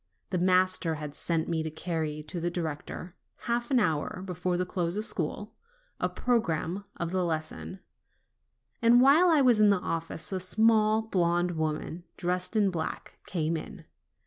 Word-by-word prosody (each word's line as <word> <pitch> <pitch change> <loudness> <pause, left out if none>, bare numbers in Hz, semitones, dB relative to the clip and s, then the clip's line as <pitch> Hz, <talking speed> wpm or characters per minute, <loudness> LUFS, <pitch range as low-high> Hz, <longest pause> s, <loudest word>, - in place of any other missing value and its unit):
The 180 - 0
master 185 -2 +3
had 150 -1 -6
sent 165 0 -1
me 165 -1 0
to 160 - -3
carry 155 -1 -3
to 170 +3 -6
the 170 +1 -1
director, 170 +1 -5 0.3
half 235 0 -1
an 260 -3 +4
hour 165 -1 -1
before 180 -1 -2
the 180 - 0
close 175 0 -2
of 215 - -1
school, 205 +2 -2 0.5
a - - 0
programme 195 -5 -1
of 170 0 -3
the 185 -1 0
lesson, 165 +3 -4 1.0
and 235 +1 +6
while 290 +8 +6
I 315 -4 +5
was 245 -4 +4
in 210 -1 +6
the 200 - +4
office, 165 -1 -4
a 190 - -1
small, 220 +3 +3
blonde 175 -4 +1
woman 160 +1 -3
dressed 180 +3 -2
in 205 -3 +3
black 160 -3 -5
came 165 -2 -1
in. 160 - -7
180 Hz, 165 wpm, -28 LUFS, 165-210 Hz, 1.0 s, and